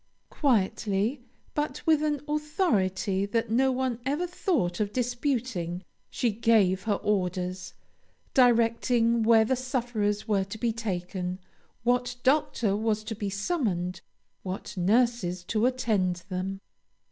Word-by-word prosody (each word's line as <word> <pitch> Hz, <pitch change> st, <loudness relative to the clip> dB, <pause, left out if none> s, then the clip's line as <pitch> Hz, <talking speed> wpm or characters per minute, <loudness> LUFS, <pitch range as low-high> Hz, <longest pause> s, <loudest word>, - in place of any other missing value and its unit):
Quietly, 220 Hz, -1 st, +1 dB, 0.3 s
but 295 Hz, 0 st, -3 dB
with 315 Hz, -2 st, +4 dB
an 300 Hz, -2 st, 0 dB
authority 210 Hz, -, 0 dB
that 225 Hz, +2 st, -1 dB
no 260 Hz, +3 st, +3 dB
one 255 Hz, -2 st, -1 dB
ever 290 Hz, +7 st, 0 dB
thought 310 Hz, -, -1 dB
of 205 Hz, -1 st, 0 dB
disputing, 240 Hz, -, -2 dB, 0.3 s
she 240 Hz, -, 0 dB
gave 205 Hz, -4 st, +3 dB
her 210 Hz, -2 st, +2 dB
orders, 185 Hz, -2 st, -1 dB, 0.6 s
directing 235 Hz, -1 st, +3 dB
where 225 Hz, 0 st, +5 dB
the 260 Hz, -, +1 dB
sufferers 240 Hz, -5 st, -1 dB
were 200 Hz, -3 st, +2 dB
to 195 Hz, +3 st, -7 dB
be 230 Hz, 0 st, 0 dB
taken, 180 Hz, -4 st, -3 dB, 0.5 s
what 245 Hz, +1 st, +1 dB
doctor 255 Hz, -7 st, +2 dB
was 215 Hz, 0 st, 0 dB
to 220 Hz, -, -4 dB
be 205 Hz, -1 st, -3 dB
summoned, 195 Hz, -, -1 dB, 0.4 s
what 185 Hz, +2 st, -6 dB
nurses 195 Hz, -2 st, +1 dB
to 215 Hz, +5 st, +1 dB
attend 205 Hz, -9 st, 0 dB
them. 190 Hz, +1 st, -3 dB
225 Hz, 125 wpm, -27 LUFS, 190-250 Hz, 0.6 s, where